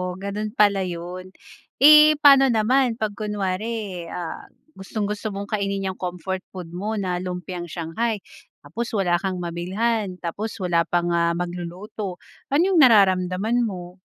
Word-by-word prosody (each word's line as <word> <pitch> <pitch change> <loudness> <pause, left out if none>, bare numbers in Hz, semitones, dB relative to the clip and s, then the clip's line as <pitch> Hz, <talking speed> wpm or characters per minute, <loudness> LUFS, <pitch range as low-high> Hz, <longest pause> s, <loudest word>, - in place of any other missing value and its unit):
Oo, 180 0 -4
ganun 200 +2 -4
pala 200 -2 +4
'yun. 180 +1 -6 0.5
Eh, 305 +2 +8
pa'no 275 -2 +7
naman 240 +2 +2
'pag 215 -2 -2
kunwari, 205 -2 -3
ah, 175 -2 -6 0.3
gustong-gusto 210 +2 -4
mong 200 0 -6
kainin 195 -1 -1
'yang - - -17
comfort 185 +1 -4
food 180 -3 -8
mo 210 +5 -3
na 180 -2 -2
lumpiang 180 -1 -5
shanghai, 195 +8 -2 0.5
tapos 230 +11 -5
wala 180 -3 +2
kang 190 -2 -2
mabilhan, 185 +4 -2
tapos 210 +7 -4
wala 175 -3 +1
pang, 175 0 0
ah, 170 0 +2
magluluto, 180 +3 -5 0.3
ano 285 +5 +3
'yung 375 -4 +3
nararamdaman 200 0 +4
mo? 180 -5 -5
195 Hz, 140 wpm, -23 LUFS, 180-215 Hz, 0.5 s, Eh